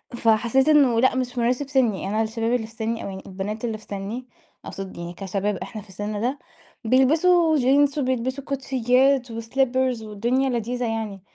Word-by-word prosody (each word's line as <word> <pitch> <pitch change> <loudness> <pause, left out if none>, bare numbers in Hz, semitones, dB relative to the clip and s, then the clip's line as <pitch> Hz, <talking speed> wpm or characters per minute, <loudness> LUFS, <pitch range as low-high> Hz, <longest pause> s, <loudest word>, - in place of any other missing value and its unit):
فحسيت 235 +4 +2
إنه 270 -7 +5
لأ 260 +1 +3
مش 250 -1 -2
مناسب 250 +4 0
سِني، 235 -8 +1
أنا 215 +2 0
الشباب 225 +2 -1
اللي 225 -3 -1
في 225 - -16
سِني 225 0 -3
أو - - -5
يعني 190 0 -8
البنات 205 +4 -5
اللي 220 -2 -2
في 215 - -17
سِني 205 +5 -5 0.4
أقصد 195 -2 -7
يعني 170 0 -6
كشباب 195 +2 -2
إحنا 195 +4 -7
في 200 - -19
السِن 205 +2 -4
ده، 260 +4 -1 0.5
بيلبسوا 315 +6 +4
جينز 280 +3 +3
وبيلبسوا 260 +1 -1
كوتشيات 260 -1 +1
وslippers 250 +1 0
والدنيا 240 +6 0
لذيذة 245 +1 -2
يعني، 220 -4 -3
235 Hz, 170 wpm, -23 LUFS, 215-260 Hz, 0.5 s, إنه